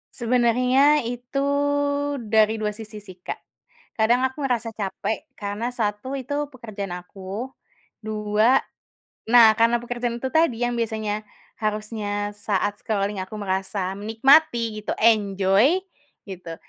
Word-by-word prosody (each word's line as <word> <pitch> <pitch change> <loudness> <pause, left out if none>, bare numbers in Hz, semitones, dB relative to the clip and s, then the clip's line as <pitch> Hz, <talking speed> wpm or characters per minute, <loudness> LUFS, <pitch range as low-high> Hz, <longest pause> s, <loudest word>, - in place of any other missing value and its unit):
Sebenarnya 250 +4 +3
itu 245 +3 -4 0.9
dari 220 0 +4
2 215 -1 -2
sisi 215 -1 -8
sih, 185 -2 -12
Kak. - - -5 0.6
Kadang 240 +4 +3
aku 260 +2 -1
merasa 235 -2 -1
capek, 205 0 -4
karena 205 +3 -3
1 215 +4 -2
itu 265 +2 -5 0.2
pekerjaan 210 -6 -6
aku. 195 +7 -7 0.5
2 215 +4 +2 0.7
nah, 230 -1 +8
karena 230 +1 +4
pekerjaan 240 0 -3
itu 265 - -2
tadi 315 -8 +2
yang 240 0 0
biasanya 215 -2 -2 0.3
harusnya 210 -1 -2
saat 205 0 -1
scrolling 205 -1 -2
aku 190 - -12
merasa 190 -1 -2
menikmati 230 0 +3
gitu, 210 - -4
enjoy 210 - +3 0.5
gitu, 175 -3 -7
220 Hz, 120 wpm, -23 LUFS, 205-240 Hz, 0.9 s, nah